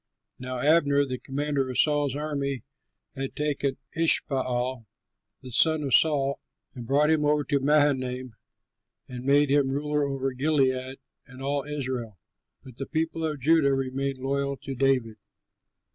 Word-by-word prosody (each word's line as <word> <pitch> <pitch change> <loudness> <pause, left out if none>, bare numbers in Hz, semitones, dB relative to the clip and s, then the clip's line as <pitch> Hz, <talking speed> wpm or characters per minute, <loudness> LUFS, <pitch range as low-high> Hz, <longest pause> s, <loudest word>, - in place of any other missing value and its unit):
Now 130 0 -5
Abner, 145 0 +3
the 130 -2 -5
commander 140 -1 -2
of 125 - -4
Saul's 145 -3 +2
army, 140 -4 -3 0.5
had 135 0 -5
taken 145 -2 -1 0.2
Ishbaal 130 -6 0 0.5
the 130 - -10
son 160 +5 +3
of 135 -3 -2
Saul 140 -3 +3 0.3
and 120 -2 -8
brought 150 +4 +3
him 155 -2 +2
over 150 0 +2
to 140 -1 0
Mahanaim 130 -4 +1 0.7
and 125 -1 -8
made 140 +1 +3
him 140 -2 +3
ruler 150 +2 -1
over 135 -1 -2
Gilead 130 -1 0 0.3
and 130 +1 -11
all 140 +1 -1
Israel. 130 -7 -4 0.5
But 130 -2 -13
the 135 - -5
people 160 0 -2
of 150 -3 -3
Judah 145 -1 +4
remained 135 +1 -2
loyal 140 +1 -2
to 135 - -5
David. 125 -4 +1
140 Hz, 145 wpm, -26 LUFS, 130-145 Hz, 0.7 s, Judah